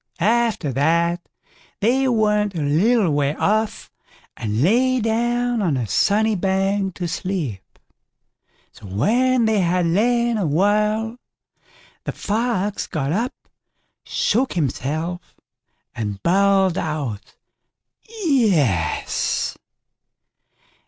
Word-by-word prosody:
After 220 - +1
that 170 +5 +1 0.6
they 260 +5 +2
went 210 -4 +1
a 165 - -2
little 185 +6 +2
way 145 0 0
off 215 +1 -1 0.4
and 110 +3 -2
lay 255 +8 +3
down 240 +1 0
on 165 -9 +1
a 125 - -1
sunny 205 - +2
bank 195 0 0
to 175 - -3
sleep. 160 - -3 1.1
So 105 - -13
when 235 - +2
they 220 -2 +2
had 180 -1 +1
lain 235 +6 +2
a 185 - 0
while 210 +7 +1 0.9
the - - -2
Fox 210 -2 -2
got 150 -5 -2
up, 230 +9 -1 0.7
shook 255 +5 0
himself, 160 +3 -3 0.6
and 105 -3 -4
bawled 195 0 +3
out 145 -10 -4 0.9
"yes". 165 - +1
195 Hz, 100 wpm, -21 LUFS, 155-225 Hz, 1.1 s, lay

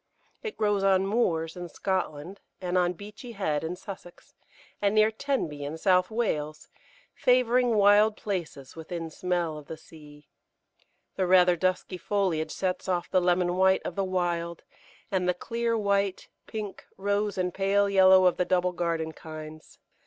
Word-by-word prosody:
It 440 -2 -6
grows 205 -2 +1
on 190 -1 +3
moors 170 -7 0
in 175 -1 -7
Scotland, 185 -1 -3 0.2
and 180 -1 -3
on 180 -1 +2
Beachy 210 +6 -10
Head 155 -8 -1
in 165 +2 -3
Sussex, 180 -2 -11 0.5
and 200 +1 +2
near 215 0 +5
Tenby 220 - -2
in 145 +3 -5
South 185 +1 +3
Wales, 155 -10 -2 0.4
favouring 250 -1 +3
wild 210 +1 +5
places 170 -9 -5
within 165 0 -6
smell 175 -3 -2
of 150 - -15
the 160 - -7
sea. 150 -2 -16 0.9
The 190 -1 +1
rather 180 -1 +5
dusky 185 +1 -1
foliage 175 -7 -1
sets 185 0 -3
off 175 -2 -1
the 185 - +3
lemon 180 0 +1
white 190 0 +3
of - - -3
the 195 - 0
wild, 175 -2 -2 0.5
and 180 -2 +1
the 180 - +1
clear 230 +4 -2
white, 200 -2 0 0.2
pink, 210 -3 -6
rose, 205 +1 -1
and 180 -1 -1
pale 200 +1 +2
yellow 190 -1 +6
of 180 - +3
the 180 - +1
double 180 0 +1
garden 165 -2 -2
kinds. 155 -1 -10
185 Hz, 155 wpm, -27 LUFS, 170-200 Hz, 0.9 s, yellow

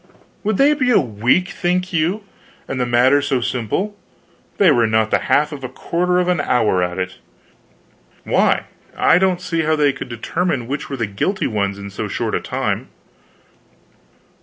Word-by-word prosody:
"Would 215 -1 0
they 285 +2 +5
be 260 -4 0
a 245 - +5
week, 125 - +1
think 180 -1 -1
you 170 +6 0 0.4
and 130 -1 -3
the 125 - 0
matter 125 +4 +4
so 140 -2 0
simple? 125 - -2 0.6
They 190 -5 +5
were 120 -4 +3
not 110 0 +1
the - - +3
half 150 +2 +3
of 140 -3 -8
a 130 - -4
quarter 180 +1 -1
of 180 0 +1
an 180 -4 +1
hour 110 -9 +2
at 90 0 -2
it." 90 0 -4 1.1
"Why, - - +2 0.3
I 170 - +4
don't 185 -1 +2
see 170 -2 -1
how 155 0 +1
they 145 -2 +2
could 130 - -8
determine 130 +3 -2
which 140 +4 -4
were 135 - -4
the 115 - -1
guilty 145 - -2
ones 100 -3 -1
in 100 0 -8
so - - -4
short - - -3
a - - +1
time." - - -2
145 Hz, 180 wpm, -19 LUFS, 115-180 Hz, 1.1 s, they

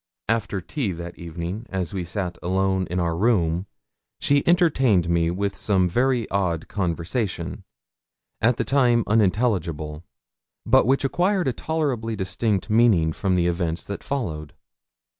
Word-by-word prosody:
After 110 -3 0
tea 110 - -3
that 85 +1 -8
evening, 85 +6 -5
as 95 -3 -3
we 95 -2 -2
sat 90 0 -4
alone 95 0 0
in 90 +2 -1
our 85 -2 0
room, 90 -3 +1 0.5
she 140 0 +3
entertained 135 - +3
me 85 -1 +2
with 100 +3 -2
some 95 -3 +1
very 120 +5 +1
odd 90 -5 -1
conversation 90 +1 -3 0.8
at 120 +1 +3
the - - 0
time 125 -4 +3
unintelligible 90 -8 0 0.6
but - - +4
which 135 +1 +2
acquired 180 +6 +1
a 130 - +1
tolerably 130 -8 -2
distinct 95 +1 -1
meaning 105 -8 +3
from 95 0 0
the 90 -1 +2
events 85 -1 -1
that 100 - -6
followed. 80 - -4
95 Hz, 140 wpm, -24 LUFS, 85-120 Hz, 0.8 s, but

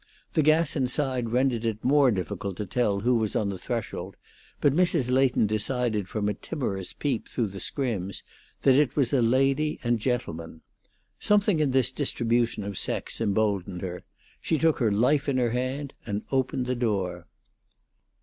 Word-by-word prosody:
The 155 - +3
gas 155 +1 +3
inside 130 -3 0
rendered 125 -1 +1
it 110 -1 -2
more 140 0 +5
difficult 100 -2 -3
to 105 - -3
tell 100 0 0
who 125 +4 +2
was 110 -2 -1
on 105 - +1
the 95 - -4
threshold, 115 0 -4 0.4
but 140 - +3
Mrs. 165 -6 +2
Leighton 130 -3 +3
decided 110 -1 -1
from 105 -2 -2
a 105 - +1
timorous 100 - -4
peep 135 -6 -2
through 115 -5 -1
the 100 0 -8
scrims 100 -9 -3 0.4
that 135 - +6
it 140 0 +3
was 135 -4 +2
a 130 - +4
lady 135 +5 +2
and 120 -1 +1
gentleman. 85 -10 -3 0.6
Something 205 -4 +3
in 150 -2 +2
this 130 -1 +2
distribution 120 -5 0
of 100 -2 -2
sex - - 0
emboldened 100 -3 0
her; 90 -1 -5 0.4
she 160 - 0
took 160 +1 +2
her 115 -5 +2
life 135 +8 +2
in 135 - +1
her 120 -2 +1
hand, 130 +3 -3
and 105 -1 -4
opened 130 -1 0
the 125 - 0
door. 95 -7 -2
120 Hz, 170 wpm, -26 LUFS, 105-135 Hz, 0.6 s, that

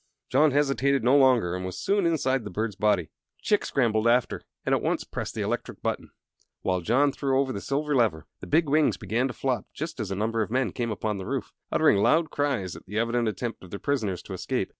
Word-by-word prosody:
John 155 +1 +5
hesitated 140 -2 +2
no 125 +4 +4
longer 125 -10 +4
and 90 - -4
was 95 -1 -5
soon 200 -3 +1
inside 135 -6 +1
the 105 - -6
bird's 105 +2 -3
body. 100 -6 +1 0.3
Chick 210 - +2
scrambled 115 -4 +1
after 120 +1 +2 0.2
and - - +1
at - - +2
once - - 0
pressed - - -6
the - - -1
electric - - -4
button, - - -2 0.5
while 90 -1 0
John 135 +10 +3
threw 135 -1 0
over 135 -1 0
the 100 - -5
silver 145 +1 -1
lever. 110 - +1
The - - -9
big 160 +1 +3
wings 150 +1 +3
began 115 +4 0
to 125 - -5
flop 130 -2 -1
just 155 -2 -5
as 110 -4 -3
a 95 - -2
number 110 +3 0
of 110 - -2
men 125 +1 0
came 120 -2 -3
upon 105 -1 -2
the 95 - -6
roof, - - -3 0.2
uttering - - +4
loud 160 +9 +3
cries 135 -11 -1
at - - -13
the 105 +3 -5
evident 115 +1 +1
attempt 110 +2 -4
of 95 - -11
their 100 - -5
prisoners 110 -9 -2
to - - -8
escape. - - -2
120 Hz, 225 wpm, -26 LUFS, 105-140 Hz, 0.5 s, John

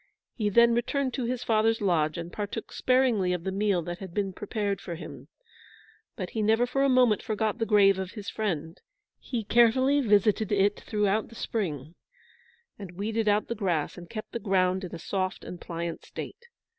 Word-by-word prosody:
He 210 -4 -1
then 235 +3 +5
returned 260 +2 0
to 255 - -2
his 250 +1 -2
father's 225 0 +2
lodge, 165 -6 +1
and 170 0 -6
partook 210 +1 -5
sparingly 245 -8 +2
of 175 -2 -3
the 190 - -2
meal 195 -3 +1
that 175 +1 -6
had 190 -3 -9
been 195 -2 -1
prepared 205 -1 -3
for 170 - -6
him. 165 - -10 0.9
But 185 -5 -5
he 220 - -2
never 220 +3 +3
for 250 +2 -1
a 275 - +3
moment 250 -5 +4
forgot 220 +1 -1
the 225 - 0
grave 195 -2 +5
of 190 -1 -5
his 210 -2 -8
friend. 170 -6 -3 0.4
He 235 -4 -4
carefully 260 +6 +4
visited 210 -2 +3
it 205 0 +2
throughout 210 0 0
the 230 - -15
spring, 160 - -3 0.9
and 190 -3 -8
weeded 220 +2 -1
out 210 0 +2
the - - -2
grass, 180 -9 -1
and 175 -1 -11
kept 215 -1 -7
the 235 - -3
ground 190 -2 +1
in 175 -2 -6
a - - -5
soft 185 +2 -3
and 175 - -8
pliant 170 -1 -5
state. 475 0 -9
205 Hz, 190 wpm, -27 LUFS, 185-225 Hz, 0.9 s, then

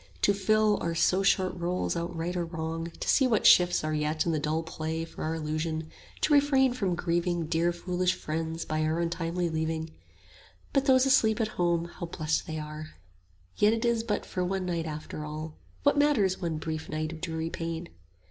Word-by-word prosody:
To 200 - +5
fill 215 +1 +2
our 170 0 -1
so 185 +3 +3
short 190 -1 +2
roles 175 +1 -1
out 170 +1 -3
right 170 +2 -3
or 175 - 0
wrong; 165 0 -4
To - - -4
see 265 - +4
what 220 -4 +1
shifts 175 -2 +6
are 155 0 -1
yet 150 +1 0
in 170 - +1
the 155 - 0
dull 155 +2 -1
play 160 0 -4
25 - - -17
For - - -6
our 160 +1 -1
illusion; 155 0 -3 0.3
to 305 - +3
refrain 275 -3 +4
from 195 -8 -1
grieving 175 0 0
Dear 165 +2 +1
foolish 180 +1 -1
friends 160 +1 -3
by 155 0 -1
our 160 +2 0
untimely 170 +1 -1
leaving: 160 0 -2 0.8
But 275 -1 +2
those 260 0 +6
asleep 235 -5 +4
at 220 -1 +1
home, 170 -4 0
how 170 0 -7
blest 160 +1 -2
are - - -3 0.4
they! 90 - -14
Yet 210 +1 +6
it 230 +1 -1
is 235 -1 +2
but 210 -3 -2
for 180 - -2
one 190 +1 -1
night 170 -2 -2
after 150 0 -6
all: 155 +1 -6 0.3
What 285 0 +4
matters 220 -12 +2
one 165 -3 -1
brief 155 0 -4
night 155 0 -2
of 160 - -10
dreary 165 -2 -3
pain? 165 0 -4
170 Hz, 200 wpm, -28 LUFS, 160-190 Hz, 0.8 s, shifts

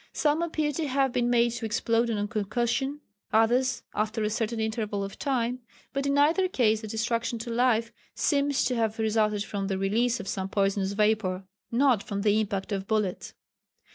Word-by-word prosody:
Some 300 +2 +1
appear 310 -3 0
to 305 +1 -2
have 270 -1 +1
been 240 -1 +1
made 240 -1 +3
to 230 -1 -4
explode 230 +2 +1
on 205 -2 -1
concussion, 240 +7 -1 0.3
others 245 +4 +2
after 215 +1 -1
a 210 - 0
certain 225 +1 -2
interval 220 -2 -2
of 195 - -7
time, 250 -3 -1 0.3
but 275 0 -1
in 280 0 +1
either 325 +6 +4
case 220 -10 +2
the 220 - -6
destruction 230 +2 -1
to 230 +1 -6
life 230 -1 +2 0.2
seems 285 -1 +1
to 250 - 0
have 225 -2 0
resulted 215 -2 +1
from 200 -2 -4
the 195 -1 -1
release 230 +6 +1
of - - -7
some 190 -1 -3
poisonous 195 0 0
vapour, 205 -3 +1 0.3
not 245 -3 +3
from 200 -1 -4
the 210 0 +3
impact 200 -1 -2
of 195 -1 -2
bullets. 210 -4 -1
225 Hz, 180 wpm, -27 LUFS, 210-250 Hz, 0.3 s, either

